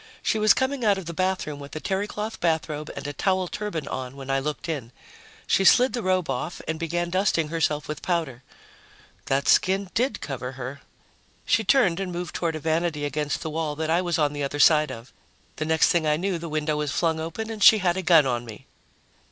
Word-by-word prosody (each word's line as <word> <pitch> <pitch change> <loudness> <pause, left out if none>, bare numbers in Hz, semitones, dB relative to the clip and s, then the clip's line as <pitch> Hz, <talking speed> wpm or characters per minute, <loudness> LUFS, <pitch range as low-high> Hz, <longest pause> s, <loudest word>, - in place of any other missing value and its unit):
She 220 - +1
was 215 0 +5
coming 260 -1 -1
out 205 -3 +3
of 190 - -6
the 170 - -5
bathroom 185 -5 -2
with 140 +1 -10
a - - -3
terrycloth 205 +4 -3
bathrobe 155 -2 -1
and - - -7
a 145 - -4
towel 185 +4 0
turban 170 -7 -4
on 130 0 -5
when 135 -1 -6
I 135 - +2
looked 150 +3 -4
in. 140 -8 -4 0.5
She 195 - +2
slid 250 +6 +5
the 240 - -2
robe 185 -3 +1
off 135 +6 -3
and 160 0 -2
began 175 +1 -2
dusting 185 -4 +1
herself 155 -2 -1
with 150 0 -5
powder. 160 -8 -2 0.9
That 135 +1 0
skin 190 0 +3
did 255 +4 0
cover 130 -2 -5
her. 130 +2 -7 0.6
She 220 - +2
turned 195 -6 +3
and 190 -2 -3
moved 175 0 -5
toward 165 -2 -1
a - - -4
vanity 160 -1 -1
against 145 0 -2
the 160 - -4
wall 155 -1 -2
that 160 +1 -2
I 170 +2 +3
was 175 -2 -1
on 150 -2 +1
the 145 -1 -3
other 140 +1 -3
side 150 -1 +5
of. 115 0 -10 0.4
The 155 - -2
next 160 0 +3
thing 165 -3 +2
I 150 0 +2
knew, 185 0 -2
the 165 0 -6
window 155 0 -1
was 150 -2 -2
flung 160 0 0
up 160 +1 -5
and 220 -1 -3
she 220 - +9
had 180 -3 +1
a 190 - -2
gun 165 -4 +5
on 120 -2 -1
me. 110 -3 -11
160 Hz, 220 wpm, -25 LUFS, 150-185 Hz, 0.9 s, she